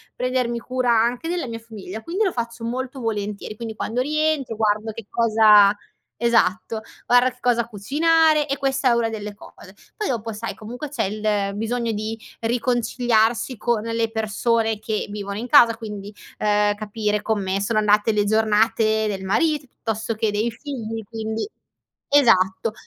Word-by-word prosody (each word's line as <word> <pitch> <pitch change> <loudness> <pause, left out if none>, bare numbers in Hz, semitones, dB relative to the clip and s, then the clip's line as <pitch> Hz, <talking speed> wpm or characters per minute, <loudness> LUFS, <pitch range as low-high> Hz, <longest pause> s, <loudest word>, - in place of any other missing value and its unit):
prendermi 250 -2 -1
cura 255 0 -1
anche 235 +6 +1
della 345 -5 -2
mia 230 - -5
famiglia, 220 -2 -9
quindi 370 +6 -1
lo 380 - +1
faccio 235 -2 -5
molto 260 +3 -4
volentieri. 210 -2 -3
Quindi, 225 0 -6
quando 230 +3 -2
rientro 305 -3 0
guardo 215 0 0
che 215 -1 -9
cosa 215 -3 +5 0.5
esatto, 225 -2 +1 0.2
guardo 245 +1 +5
che 250 - -21
cosa 240 -2 +1
cucinare, 305 +8 +2
e 275 -1 -2
questa 270 -1 +1
è - - +4
una 235 -1 +2
delle 210 -2 -5
cose; - - -14 0.2
poi 425 - -2
dopo, 225 -2 -2
sai, 225 +2 -5
comunque 245 +7 -7
c'è 290 - -2
il 205 -1 -1
bisogno 230 +2 -1
di 215 +2 -4 0.2
riconciliarsi 240 0 +1
con 225 0 0
le 230 0 -1
persone 220 0 0
che 215 0 -3
vivono 200 -1 -5
in 240 +3 -4
casa 235 -5 +6
quindi, 210 -2 -7 0.3
ehm, 210 0 +2
capire 210 0 -2
come 195 -3 -1
sono 215 +2 +1
andate 210 +1 +3
le 210 -1 +1
giornate 220 0 +2
del 195 -2 -3
marito 295 +9 +1
piuttosto 225 -1 -4
che 220 0 0
dei 215 +3 0
figli 225 -3 -6
quindi 220 - -4 0.6
esatto, 225 -6 +3
225 Hz, 155 wpm, -22 LUFS, 210-245 Hz, 0.6 s, casa